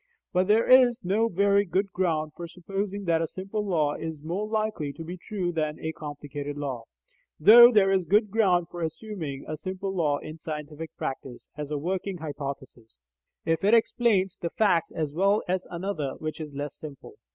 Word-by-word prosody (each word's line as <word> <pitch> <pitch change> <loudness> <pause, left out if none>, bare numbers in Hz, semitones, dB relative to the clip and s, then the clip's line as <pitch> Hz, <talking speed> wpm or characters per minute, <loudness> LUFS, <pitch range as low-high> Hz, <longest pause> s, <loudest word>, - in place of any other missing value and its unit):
But 185 0 +2
there 215 +2 +4
is 250 -4 +5
no 210 +5 +2
very 200 +1 +3
good 195 +1 -1
ground 160 -5 0
for 170 - -6
supposing 195 +3 -4
that 165 -3 +2
a 165 - 0
simple 195 +5 -4
law 160 -7 +1
is 160 -2 -6
more 185 +7 -3
likely 215 -9 -1
to 165 - -8
be 175 +3 -6
true 185 -1 -3
than 155 -2 -2
a 160 - -3
complicated 145 -1 -7
law, 130 -5 -4 0.5
though 235 +8 +10
there 200 -4 +4
is 190 -2 +2
good 210 +1 +3
ground 185 -6 +2
for 175 - -6
assuming 160 -4 -5
a 155 - -3
simple 190 +3 -4
law 155 -6 +1
in 155 +2 -9
scientific 155 0 -6
practice, 130 -2 -6
as 150 -1 -5
a 150 - -2
working 185 +4 -3
hypothesis, 140 - -7 0.5
if 165 +1 0
it 210 +4 +5
explains 220 -5 +2
the 170 - -3
facts 190 -4 +2
as 155 -3 -3
well 195 +5 +2
as 185 +1 -1
another 170 -6 -3
which 155 +1 -5
is 150 -2 -7
less 145 0 -4
simple. 145 -3 -10
175 Hz, 185 wpm, -27 LUFS, 150-200 Hz, 0.5 s, though